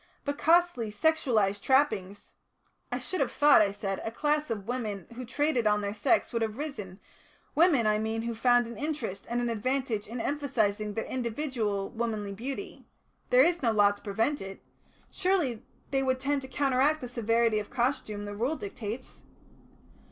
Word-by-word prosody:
But 285 0 -2
costly 335 -9 +3
sexualised 215 -7 +2
trappings 205 -8 +1 0.3
" - - -41
"I - - 0
should 370 -5 -3
have 265 - +1
thought," 290 -4 +6
I 200 -2 +3
said, 200 -1 -4
"a - - -2
class 300 +5 0
of 210 -3 -4
women 215 -6 -3
who 250 +2 -6
traded 270 -2 +1
on 210 0 +3
their 200 0 -2
sex 230 +8 +1
would 230 - 0
have 220 0 -2
arisen, 215 -11 -6 0.5
women, 315 -8 +4
I 215 0 +3
mean, 220 +1 -2
who 235 0 -2
found 245 +1 +3
an 235 +1 -8
interest 285 -10 -4
and 240 +1 0
an 240 - 0
advantage 235 -1 -1
in 235 +3 -6
emphasising 215 -7 -1
their 225 - -2
individual 235 -5 -2
womanly 220 -4 -3
beauty. 270 - -6 0.4
There 250 +1 +7
is 345 +2 +2
no 235 -4 +2
law 205 -2 +5
to 205 - -10
prevent 225 +8 -1
it. 195 0 -8 0.5
Surely 340 - 0 0.3
they 270 -1 +2
would 260 -1 0
tend 280 +1 0
to 265 - -8
counteract 275 +3 +2
the 250 - -4
severity 230 -2 +1
of 205 - -7
costume 235 -5 -1
the 205 - -5
Rule 250 +9 0
dictates." 220 +1 -7
235 Hz, 175 wpm, -29 LUFS, 210-280 Hz, 0.5 s, There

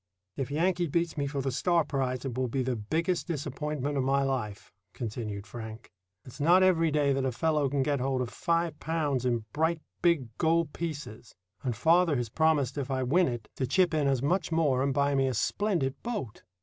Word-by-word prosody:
"If 135 -2 -3
Yankee 175 +4 +1
beats 170 +2 0
me 145 -1 -1
for 140 0 -2
the 135 0 -1
Starr 170 +5 +2
prize, 130 -3 -2
it 130 -3 -3
will 130 0 0
be 130 +2 -1
the 125 0 -1
biggest 165 - -1
disappointment 150 -2 -3
of - - +1
my 135 +1 +2
life," 120 -7 -3 0.2
continued 105 -3 -5
Frank. 110 0 -9 0.3
"It's 130 +3 -12
not 175 +6 +5
every 165 -3 +4
day 145 -2 +2
that 135 0 0
a 130 - 0
fellow 150 +2 +1
can 140 0 +1
get 140 0 0
hold 130 0 0
of 120 - -6
five 170 -2 -1
pounds 150 -6 -1
in 120 -3 0
bright 160 +2 +1 0.2
big 135 -10 +1
gold 165 -2 +2
pieces; 140 -9 -6 0.3
and 125 -4 -2
father 165 - +4
has 120 -3 -2
promised 145 -1 +1
if 135 - -4
I 130 -1 0
win 170 +8 +3
it 120 -3 -4
to 130 - -1
chip 180 +5 +3
in 150 -3 +2
as 135 -2 +1
much 170 +4 0
more 150 -6 +2
and 140 +1 +1
buy 140 +1 +2
me 135 -1 +2
a 130 - -1
splendid 170 - 0
boat." 210 - -4
140 Hz, 205 wpm, -29 LUFS, 130-165 Hz, 0.3 s, not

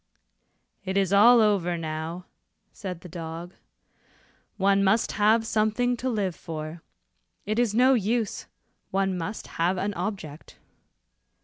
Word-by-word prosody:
"It 190 0 -2
is 195 -1 +1
all 230 +4 +7
over 190 -5 +2
now," 160 +2 -5 0.5
said 180 -5 -7
the - - -10
dog, 170 +1 -7 1.0
"one 195 0 +3
must 210 +4 +2
have 220 +2 +3
something 225 +3 +1
to 260 +2 -2
live 205 -6 -1
for. 160 0 -7 0.6
It 215 +3 -1
is 230 -4 +1
no 255 +3 +5
use, 225 -1 -1 0.4
one 195 -1 0
must 180 +5 -5 0.2
have 180 +3 +2
an 200 +3 -1
object." 175 -10 -6
195 Hz, 125 wpm, -26 LUFS, 175-220 Hz, 1.0 s, all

